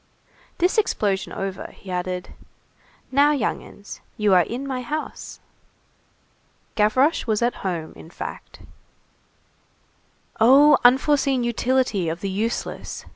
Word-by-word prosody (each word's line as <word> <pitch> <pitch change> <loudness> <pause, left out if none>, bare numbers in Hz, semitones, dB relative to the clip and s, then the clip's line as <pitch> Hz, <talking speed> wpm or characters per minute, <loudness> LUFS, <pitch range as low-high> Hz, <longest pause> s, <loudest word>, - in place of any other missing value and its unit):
This 365 +5 +2
explosion 200 - -1
over, 195 -1 -5
he 190 - -11
added:— 180 0 -4 0.8
"Now, 285 +3 +4
young 280 - -1
'uns, 205 - -12 0.2
you 210 -2 +2
are 180 - +6
in 245 +9 -4
my 260 -2 -3
house." 300 +5 -6 1.3
Gavroche 255 +10 +2
was 220 0 +1
at 240 - 0
home, 170 -4 -4
in 160 - -13
fact. - - -9 1.8
Oh, 275 +5 +6
unforeseen 265 +1 +3
utility 240 -6 0
of 165 +2 -5
the 195 - -3
useless! 220 +5 -4
230 Hz, 115 wpm, -23 LUFS, 195-270 Hz, 1.8 s, are